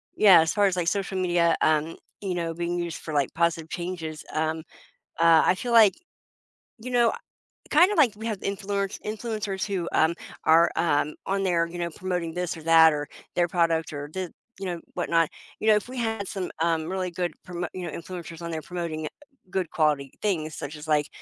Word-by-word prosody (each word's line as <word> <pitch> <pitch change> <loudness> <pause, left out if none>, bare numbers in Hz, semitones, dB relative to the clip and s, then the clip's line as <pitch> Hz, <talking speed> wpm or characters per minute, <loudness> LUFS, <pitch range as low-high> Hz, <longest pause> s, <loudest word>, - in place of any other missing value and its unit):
Yeah, 195 -5 +8
as 160 - 0
far 205 -1 +3
as, 190 - 0
like, 175 -2 0
social 195 -1 -2
media, 175 -2 +3
um, 155 +1 +2 0.2
you 195 -3 -2
know, 165 -1 -2
being 175 +1 -2
used 170 -2 -3
for, 155 - -6
like, 140 -3 +1
positive 165 -1 0
changes, 165 -3 -5
um, 160 +1 -1 0.6
uh, 165 -1 +6
I - - +4
feel 240 +5 -4
like, 220 -4 +7 0.9
you 250 +3 -7
know, 240 -2 +4
I - - -5 0.5
kind 350 +6 +6
of 420 - -1
like 255 -8 +5
we 220 +2 -8
have 215 -4 -2
the - - -4
influence 200 0 -2
influencers 215 -2 -3
who, 185 -4 -2
um, 160 +2 +3 0.3
are, 165 +1 +6
um, 150 -2 +1
on 195 0 0
there, 170 -3 +2
you 175 - -8
know, 170 -1 -2
promoting 175 -1 -3
this 180 0 -3
or 160 - -10
that, 165 0 +7
or 145 -1 -3 0.3
their 175 -1 +3
product, 165 -2 +1
or 145 0 -5
the 185 -2 -4 0.3
you 195 - -5
know, 175 -2 -3
whatnot, 165 -1 +2 0.3
you 220 - -2
know, 215 - +7
if 210 - -1
we 255 - -8
had 225 -4 -2
some, 185 -2 -4
um, 165 -1 +1
really 185 -1 -2
good 175 -1 -2 0.2
promo 175 -1 -3
you 185 - -5
know, 165 - -5
influencers 170 -1 -8
on 170 0 -5
there 160 -1 -3
promoting 170 -3 -4 0.4
good 185 -3 -1
quality 150 -4 +1
things, 160 -7 -1
such 145 +2 -6
as, 150 0 -9
like, 150 -2 +2
175 Hz, 210 wpm, -26 LUFS, 160-195 Hz, 0.9 s, Yeah